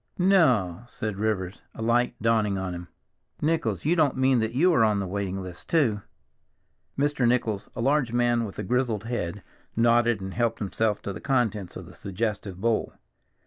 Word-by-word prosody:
"No!" 130 - +3
said 110 -5 -4
Rivers, 100 -3 -2
a - - -7
light 120 +2 +2
dawning 110 -3 +2
on 95 -1 -3
him. 90 0 -7 0.5
"Nichols, 160 0 0
you 165 +3 +3
don't 155 -6 +2
mean 130 -1 +3
that 110 +1 -2
you 175 +6 +4
are 125 - +4
on 105 -2 +3
the 100 - -2
waiting 95 0 -3
list 90 -2 -9
too?" 120 -11 +2 1.0
Mr. 140 -3 +2
Nichols, 115 -4 0
a - - -3
large 135 -1 +2
man 120 -1 +2
with 100 -4 -7
a 105 - -3
grizzled 120 0 0
head, 105 -5 -3 0.3
nodded 120 -1 +3
and 95 -1 -6
helped 115 -1 0
himself 105 +1 -1
to 100 - -4
the - - -8
contents 110 -8 0
of - - -7
the - - -13
suggestive 100 -1 -4
bowl. 115 +1 0
115 Hz, 180 wpm, -26 LUFS, 100-125 Hz, 1.0 s, you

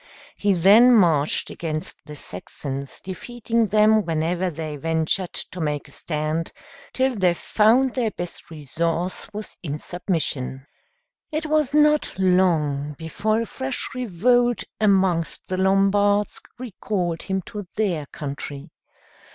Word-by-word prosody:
He 205 -1 +2
then 210 +8 +7
marched 160 -8 +3
against 155 -2 -4
the 150 - -8
Saxons, 135 +5 -6
defeating 230 +3 -2
them 215 +1 +4
whenever 170 +2 0
they 155 -2 -5
ventured 160 +4 0
to 180 - -4
make 150 -2 -2
a - - -17
stand, 155 +1 -3 0.4
till 260 -1 +1
they 180 -4 +2
found 235 +8 +3
their 240 -4 0
best 175 -4 -7
resource 165 +4 -2
was 210 0 -7
in 150 -4 -4
submission. 150 -7 -3 0.7
It 310 +1 -2
was 305 -2 +1
not 300 -7 +3
long 160 -6 +2
before 205 +7 -1
a - - -2
fresh 260 +2 -4
revolt 245 +1 +2 0.2
amongst 190 -5 +2
the 185 - -3
Lombards 195 +2 +2 0.2
recalled 190 -7 -3
him 190 -1 -2
to 205 0 -7
their 180 -9 -1
country. 140 -1 -7
185 Hz, 125 wpm, -23 LUFS, 160-215 Hz, 0.7 s, then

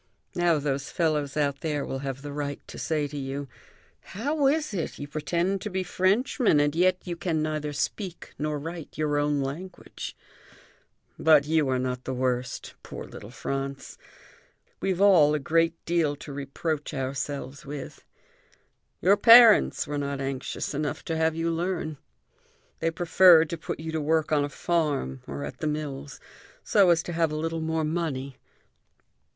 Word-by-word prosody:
Now 175 -2 +2
those 140 -2 -2
fellows 150 -4 0
out 140 -2 0
there 150 -3 -1
will 135 - -4
have 135 0 -5
the 145 -1 -6
right 145 -1 -3
to - - -9
say 155 -2 -1
to 145 +1 -8
you: 135 +1 -4 0.5
'How 280 +7 -1
is 305 -2 +1
it; 170 -5 -3
you 145 - -6
pretend 170 +6 -1
to 210 - -4
be 190 -1 -2
Frenchmen, 195 - +2
and 145 +1 +2
yet 185 +2 +3
you 175 -2 -3
can 165 -3 -1
neither 155 -1 -2
speak 175 +5 -4
nor 150 0 -1
write 165 +2 -7
your 150 -1 +1
own 145 -1 +1
language?' 165 +8 -6 1.0
But 155 -3 +5
you 155 -2 +2
are 130 - +1
not 125 0 -3
the 130 - -3
worst, 125 0 -2
poor - - -8
little 100 - -10
Franz. 135 +3 -5 0.8
We've 190 -2 -1
all 175 -7 +6
a - - 0
great 165 +3 +2
deal 165 -4 +1
to 145 0 -9
reproach 145 +2 -3
ourselves 135 0 -4
with. 140 -1 -8 1.0
"Your 195 +4 +5
parents 230 0 +7
were 145 0 -3
not 140 -1 -3
anxious 135 +1 -3
enough 145 +1 -3
to 165 - -2
have 160 0 +1
you 165 +1 0
learn. 165 -3 -2 0.8
They 165 - +1
preferred 165 -1 +5
to - - -1
put - - -5
you 160 0 -5
to 160 -1 -1
work 155 +1 +1
on 150 -2 +3
a 145 - -2
farm 145 - -1
or 70 0 -5
at 70 - -8
the 155 - -2
mills, 145 -2 -4 0.4
so 200 -4 +4
as 170 -1 +4
to 175 - -5
have 165 -1 +1
a - - -3
little 165 +1 -2
more 160 0 -1
money. 150 -5 -3
155 Hz, 170 wpm, -27 LUFS, 140-170 Hz, 1.0 s, parents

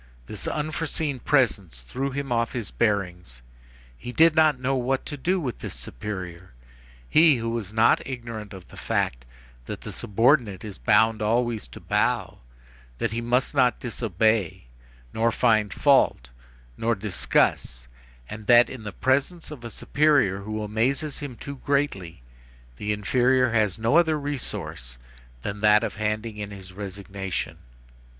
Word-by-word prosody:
This 105 - -6
unforeseen 155 -2 -2
presence 100 - +1
threw 135 - -3
him 140 -1 -4
off 115 -1 0
his 115 -5 -4
bearings; 90 - -2 0.5
he 65 - -8
did 160 +4 +5
not 155 -4 +4
know 130 +1 0
what 130 +1 -1
to 145 - -5
do 180 +7 0
with 130 -9 -4
this - - -6
superior, 90 +8 -7 0.5
he, 155 - +6
who 115 -1 -3
was 115 -4 -4
not 110 +2 +4
ignorant 115 -5 -7
of 95 -3 -11
the - - -14
fact - - -1 0.4
that - - -6
the - - -7
subordinate 115 -2 +1
is 105 -3 -8
bound 110 0 +3
always 115 - 0
to - - -11
bow, - - 0 0.6
that - - -1
he 115 +1 -2
must 125 +4 0
not 130 -4 +3
disobey, 110 - 0 0.5
nor 115 +1 +2
find 110 -4 +2
fault, 135 - +3 0.5
nor 115 +1 +1
discuss, 90 - 0 0.4
and 110 +6 -9
that, 120 0 +6
in 130 - -8
the 105 -1 -6
presence 140 - 0
of 140 -6 -9
a 120 - -6
superior 140 -7 +2
who 110 +2 -4
amazes 130 +8 -1
him 140 -4 -6
too 140 +4 -8
greatly, 130 - -2 0.5
the 105 - -2
inferior 125 +4 +2
has 110 -4 +1
no 115 +7 +2
other 160 -3 +3
resource 130 - -5 0.5
than 100 0 -5
that 105 +1 +5
of - - -2
handing 110 +1 -2
in 105 -1 -5
his 95 -2 -11
resignation. 95 -1 -5
115 Hz, 150 wpm, -25 LUFS, 100-130 Hz, 0.6 s, he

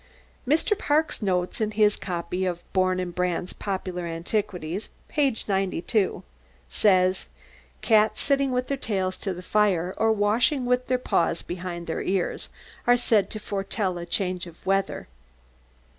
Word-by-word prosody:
Mr. 320 - +3
Park's 310 - +1
note 180 0 0
in 215 - +2
his 210 -1 +3
copy 180 0 -3
of 175 -2 -2
Bourn 185 -1 +2
and 180 -1 -3
Brand's 180 0 -1
"Popular 185 -3 -3
Antiquities," 175 +1 -3 0.2
p. 280 -5 +1
92, 195 +1 0 0.4
says: 185 -2 +3 0.5
"Cats 215 -1 +4
sitting 275 -1 +2
with 250 0 0
their 275 - -1
tails 190 -6 -1
to 195 - -3
the 180 0 -6
fire, 185 -4 +2
or 225 0 +3
washing 225 +6 +2
with 250 0 +1
their 255 - +2
paws 170 -8 0
behind 175 -1 -5
their 160 - -3
ears, 190 -1 -1 0.4
are 245 0 +6
said 220 -4 +2
to 215 - -5
foretell 195 -2 -2
a 170 - -6
change 185 -1 -1
of 170 +1 -15
weather." 195 0 0
195 Hz, 145 wpm, -26 LUFS, 180-220 Hz, 0.5 s, are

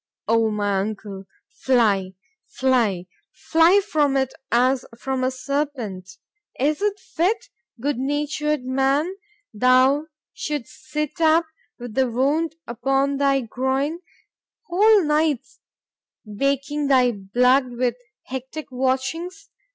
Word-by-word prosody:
—O 225 0 +3
my 205 -2 0
uncle;—fly—fly,—fly 215 - 0
from 295 -8 +1
it 265 -1 0 0.2
as 250 +2 +3
from 265 +1 -2
a 255 - +2
serpent.——Is 270 - -4
it 415 0 0
fit——goodnatured 290 - -2
man! 270 +6 +1 0.4
thou 255 +6 +4 0.3
should'st 290 -3 -6
sit 300 +1 -3
up, 325 +1 +4 0.3
with 245 -2 -8
the 260 +1 +2
wound 290 +7 0
upon 270 +4 0
thy 275 -1 +2
groin, 265 +7 -1 0.7
whole 410 +2 +4
nights 300 -3 0 0.7
baking 275 +6 -1
thy 255 -3 +4
blood 250 +6 +2
with 245 -1 +1 0.3
hectic 265 +3 -7
watchings? 270 +10 -2
265 Hz, 90 wpm, -22 LUFS, 240-300 Hz, 0.7 s, thou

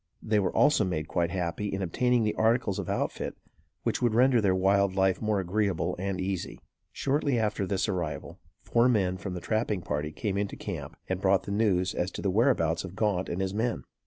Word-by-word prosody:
They 110 -1 +2
were 95 - +1
also 150 -7 +4
made 80 -5 -2
quite 85 -2 0
happy 90 +2 -2
in 95 -1 -2
obtaining 125 +6 +2
the 105 - +1
articles 110 -3 +1
of - - -4
outfit - - -2 0.5
which - - -1
would 120 -3 +2
render 125 0 +5
their 95 -3 +2
wild 95 0 +2
life 95 -1 +2
more 110 -2 +1
agreeable 95 0 0
and 95 0 -2
easy. 95 -1 -3 0.3
Shortly 140 -2 0
after 105 -3 0
this 95 +2 0
arrival, 85 -8 -4 0.2
four 120 +1 +3
men 95 -6 +1
from 95 -1 -5
the 90 - -5
trapping 110 -4 -1
party 75 0 -2
came 100 +3 -2
into 100 -1 -2
camp 80 -5 -6
and 95 0 -2
brought 95 -1 +3
the - - -6
news 95 -4 +1
as 90 - -1
to - - -6
the 100 - +1
whereabouts 90 - +2
of 95 0 -8
Gaunt 100 -4 0
and 90 +2 -2
his 95 0 -1
men. 110 - -1
95 Hz, 205 wpm, -28 LUFS, 90-110 Hz, 0.5 s, render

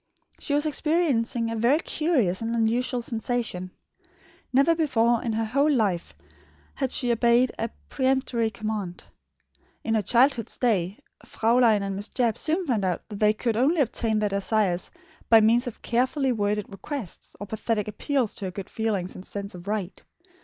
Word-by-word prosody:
She 285 - -1
was 295 +1 +2
experiencing 280 -8 +1
a - - -2
very 235 +6 +3
curious 295 - 0
and 230 +1 -2
unusual 235 +2 0
sensation. 225 -5 -3 0.8
Never 275 +6 +4
before 240 -8 +2
in 230 - -2
her 225 +1 0
whole 280 +7 +2
life 205 -10 0 0.6
had 265 -2 -2
she 245 -3 +1
obeyed 235 +2 +3
a 225 +1 -1 0.2
peremptory 260 -4 0
command. 210 -4 -5 0.8
In 225 - -1
her 220 - +2
childhood's 240 +2 +2
days, 200 -6 +1 0.3
Fraulein 225 -2 +3
and 195 -1 -3
Miss 205 +2 -5
Jebb 235 -4 0
soon 335 +4 0
found 235 -9 0
out 185 -2 -2
that 205 -2 -7
they 210 0 +4
could 225 +1 -1
only 285 +9 +2
obtain 225 -3 0
their 210 -1 +1
desires 200 -2 0 0.4
by 225 - +8
means 235 +4 +3
of 245 - -8
carefully 260 +3 +1
worded 210 -2 0
requests, 205 - -7
or 205 - -5
pathetic 215 0 -2
appeals 240 +2 -1
to 200 - -6
her 185 - -3
good 190 +1 -8
feelings 205 -5 -2
and 185 - -10
sense 200 +1 -6
of 180 +1 -11
right. 205 -3 -3
225 Hz, 165 wpm, -25 LUFS, 210-255 Hz, 0.8 s, by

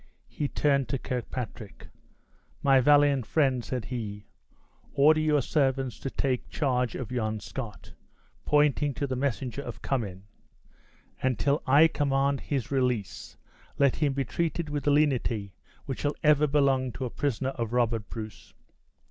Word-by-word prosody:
He 145 - -3
turned 140 -3 +1
to 135 - 0
Kirkpatrick. 120 -4 -6 0.8
"My 135 -1 +5
valiant 145 -2 +4
friend," 135 -6 +2
said 125 -3 -4
he, 105 -5 -5 0.7
"order 155 +3 +5
your 150 -3 +2
servants 135 -4 0
to 135 - -4
take 130 -1 -2
charge 125 -5 0
of 125 -3 -5
yon 110 -3 -1
Scot," 110 0 -8 0.5
pointing 145 -1 +2
to 140 - -1
the 130 -2 -3
messenger 130 0 -2
of - - -8
Cummin; 100 -8 -2 1.0
"and 130 -3 +1
till 140 +5 +1
I 145 +5 +7
command 140 -2 0
his 135 -4 -3
release, 125 -7 -2 0.4
let 140 -2 +3
him 145 -3 +1
be 135 0 -1
treated 165 +5 -2
with 145 -1 -3
the 145 - +4
lenity 125 -9 +1 0.3
which 135 -3 -4
shall 145 0 -1
ever 150 -1 +5
belong 135 -3 +2
to 130 - -4
a 120 - -5
prisoner 135 -2 -1
of 115 -4 -4
Robert 115 -3 0
Bruce!" 110 -2 -9
135 Hz, 150 wpm, -28 LUFS, 120-145 Hz, 1.0 s, I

